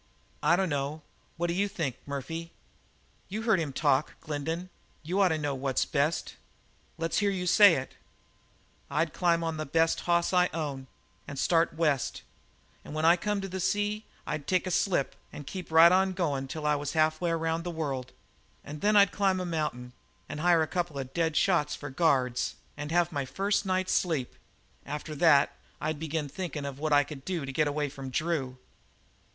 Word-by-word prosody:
"I 150 +3 +4
dunno; 150 -4 -1 0.3
what 170 - 0
d'you 190 +4 +1
think, 160 - -3
Murphy?" 165 +4 -5 0.8
"You 215 +4 -4
heard 220 -5 +3
him 155 -4 -2
talk, 140 0 +1
Glendin. 160 +4 -4 0.3
You 180 +5 0
ought 195 - +6
to 160 -3 +1
know 145 -2 -2
what's 135 0 0
best." 150 +3 -1 0.6
"Let's 165 0 0
hear 205 -1 +2
you 185 -2 -2
say 200 0 +7
it." 130 -1 -5 1.0
"I'd 155 +1 0
climb 170 -2 +2 0.2
the 155 - -3
best 165 +3 +2
hoss 170 +1 +1
I 180 0 +5
owned 140 -5 -4 0.4
and 140 - -7
start 165 +3 +2
west, 150 -6 0 0.6
and 150 - -8
when 155 +1 0
I 170 +1 +7
come 205 +3 -2
to 195 - -4
the 190 0 -5
sea 205 +3 0 0.2
I'd 150 -2 -4
take 185 0 +1
a 185 - -2
ship 175 -5 +1 0.2
and 145 - -9
keep 180 +4 -7
right 165 +1 +8
on 190 +1 +3
goin' 145 -7 -1
till 150 +2 -5
I 150 0 +3
got 145 -1 -4
halfway 155 +2 +1
around 165 0 -1
the 175 - -4
world. 140 -6 -3 0.5
And 150 +1 -8
then 210 +1 +3
I'd 200 -2 +6
climb 195 -2 +1
a 180 - -2
mountain 150 -7 -3 0.3
and 150 - -6
hire 170 0 +4
a - - -2
couple 175 -4 -2
of 135 -1 -5
dead 160 -2 0
shots 165 -4 +2
for 145 -1 -7
guards 130 -5 +1 0.2
and 145 +1 -6
have 175 0 +2
my 140 -3 -2
first 200 +7 0
night's 185 0 +1
sleep. 155 -8 0 0.5
After 150 +2 -5
that 145 -3 +5 0.2
I'd 155 -1 -2
begin 160 -1 -2
thinkin' 155 -1 -5
of 140 -1 -6
what 155 0 -1
I 145 0 +6
could 145 -2 -9
do 175 -4 -3
to 135 - -5
get 155 +2 +2
away 145 0 -1
from 135 -1 -7
Drew." 135 -3 -2
160 Hz, 185 wpm, -29 LUFS, 145-180 Hz, 1.0 s, right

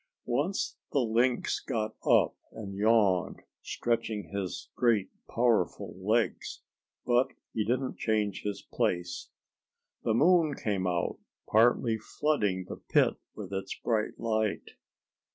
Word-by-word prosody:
Once 145 +11 -1 0.2
the 140 - +3
Lynx 120 +1 +1
got 110 -1 -3
up - - +4 0.2
and 100 -3 -7
yawned, 100 -3 +2 0.2
stretching 115 -3 -2
his 95 -5 -4
great, 115 -5 +2 0.2
powerful 120 -1 +1
legs, 110 +5 -1 0.4
but 125 +1 +2 0.2
he 110 - 0
didn't 125 +4 -1
change 105 -3 0
his 100 -1 -4
place. 90 -7 -2 0.7
The 110 - +1
moon 160 +1 +4
came 95 -4 -1
out, 85 -1 -1 0.3
partly 115 0 +3
flooding 105 -7 0
the - - -7
pit - - +2 0.2
with 100 -2 -7
its 95 0 -3
bright 110 -2 -1
light. 110 -2 -1
110 Hz, 115 wpm, -30 LUFS, 100-120 Hz, 0.7 s, up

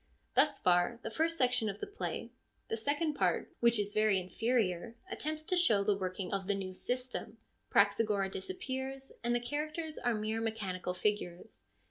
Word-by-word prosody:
Thus - - +4
far 180 +5 +3
the 225 - -4
first 330 +6 +1
section 250 -4 +3
of 200 +1 -5
the - - -3
play. 410 +1 -4 0.4
The - - 0
second 290 +7 0
part, - - +1
which 235 -1 +5
is 205 0 -1
very 215 -2 +4
inferior, 220 +1 0 0.2
attempts 310 +1 -3
to 365 +3 0
show 225 - +5
the 205 0 +3
working 185 -1 -3
of 195 -1 -2
the 200 - +2
new 190 -1 -4
system. 250 +6 -3 0.3
Praxagora 205 -3 +3
disappears, 270 - -4
and 240 0 +2
the - - +3
characters 305 +5 -3
are 240 -1 +1
mere 215 +1 -1
mechanical 195 -5 -2
figures. 180 - -2
225 Hz, 165 wpm, -33 LUFS, 195-265 Hz, 0.4 s, which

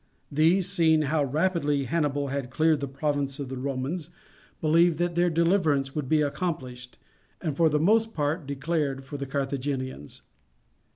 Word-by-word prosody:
These, 165 +5 +3
seeing 160 -2 +3
how 150 +1 +1
rapidly 150 0 0
Hannibal 145 0 -1
had 135 -2 -3
cleared 155 +2 +2
the 140 - -3
province 140 0 -2
of 140 -3 -5
the 130 - -5
Romans, 140 +6 -3 0.5
believed 165 +1 +3
that 175 +1 0
their 175 +1 +2
deliverance 160 -5 +2
would 145 -4 -3
be 155 -1 +3
accomplished, 130 -6 -4 0.4
and 155 -6 -3
for 165 +1 +4
the 150 0 +1
most 225 +6 +2
part 150 +1 -1
declared 140 -1 -2
for 140 +2 -7
the 140 -1 -5
Carthaginians. 135 - -4
145 Hz, 155 wpm, -27 LUFS, 135-165 Hz, 0.5 s, for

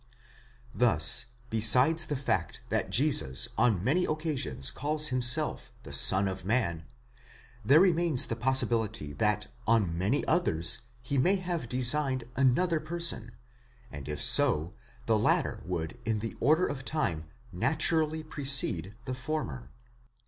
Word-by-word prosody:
Thus 120 0 +2 0.2
besides 125 +9 +4
the 145 - -4
fact 135 0 -4
that - - -3
Jesus 115 - +4
on 110 -5 -1
many 160 - 0
occasions 145 - -2
called 150 +2 -3
himself 125 -4 +3
the - - -11
Son 95 +1 +6
of 95 -1 -7
Man, 90 -6 -3 0.8
there 140 +9 +3
remains 170 -7 +1
the 115 - -5
possibility 115 - -2
that 105 +6 -2 0.2
on 105 -7 0
many 100 - -1
others, 115 - +1 0.2
he 135 +2 -3
may 185 +9 +1
have 175 -9 -6
designed 130 +1 +1
another 155 +6 0
person; 155 -7 -1 0.6
and 70 -1 -10
if 75 -1 -3
so, 80 +4 +3 0.3
the 110 -2 0
latter - - -2
would 85 +4 -6
in 110 -1 -3
the 115 +2 -7
order 160 +5 +1
of 135 -2 -7
time 85 - -4 0.3
naturally 155 - -2
precede 135 - +2
the 130 - -6
former. 125 - -7
125 Hz, 130 wpm, -27 LUFS, 95-155 Hz, 0.8 s, Son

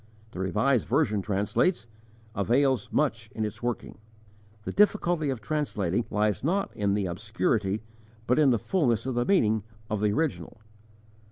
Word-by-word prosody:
The - - -8
Revised 105 +7 +1
Version 115 -6 +1
translates, 105 - 0 0.5
"avails 130 +5 +1
much 115 -7 0
in 110 - -1
its 105 - -6
working." 120 -3 -4 0.6
The - - -4
difficulty 175 -7 +2
of 130 -5 -3
translating 110 - -1
lies 105 +1 0
not 190 +7 0
in 100 -1 +1
the 100 -2 0
obscurity 105 +2 -1 0.4
but 125 +5 +2
in 150 -3 +5
the 120 - +3
fulness 120 - 0
of 130 - -2
the 120 0 0
meaning 110 - +3 0.3
of 105 -1 -1
the 105 -1 +2
original. 150 -4 -2
115 Hz, 150 wpm, -27 LUFS, 105-140 Hz, 0.6 s, in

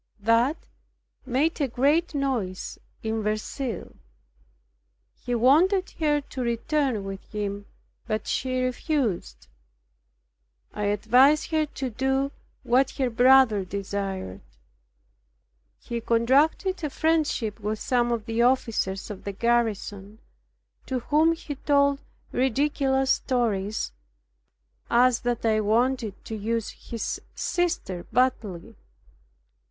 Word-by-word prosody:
That 230 +8 +3 0.7
made 290 +6 +1
a 280 - +2
great 290 +7 +1
noise 245 -10 -2 0.2
in 220 0 -1
Verceil. 215 +1 -3 1.2
He 245 0 -4
wanted 340 - +4
her 295 -2 +2
to 275 -1 -7
return 240 0 0
with 195 0 -6
him, 205 -1 -4 0.4
but 215 -2 -2
she 255 -1 -1
refused. 255 - -2 1.3
I 210 - -2
advised 260 +10 +4
her 310 -1 +1
to 265 -3 -5
do 265 +3 0 0.3
what 260 +3 +3
her 260 -3 0
brother 245 -3 +5
desired. 195 - -4 1.4
He 235 -1 -5
contracted 280 - +2
a 300 - 0
friendship 290 -9 0
with 215 +1 -2
some 240 +1 +1
of 230 -3 -2
the 225 0 -1
officers 230 -6 +1
of 200 - -9
the 200 - -3
garrison, 210 -2 -1 0.7
to 255 -2 -2
whom 310 +5 +3
he 320 -2 -6
told 280 0 +2 0.3
ridiculous 265 +1 +1
stories, 220 - 0 1.0
as 245 0 +4
that 240 -1 -2
I 220 -1 +3
wanted 225 0 0
to 220 - -5
use 225 +1 -2 0.2
his 230 -2 -3
sister 340 - -2
badly. 230 -6 0
240 Hz, 105 wpm, -26 LUFS, 215-275 Hz, 1.4 s, brother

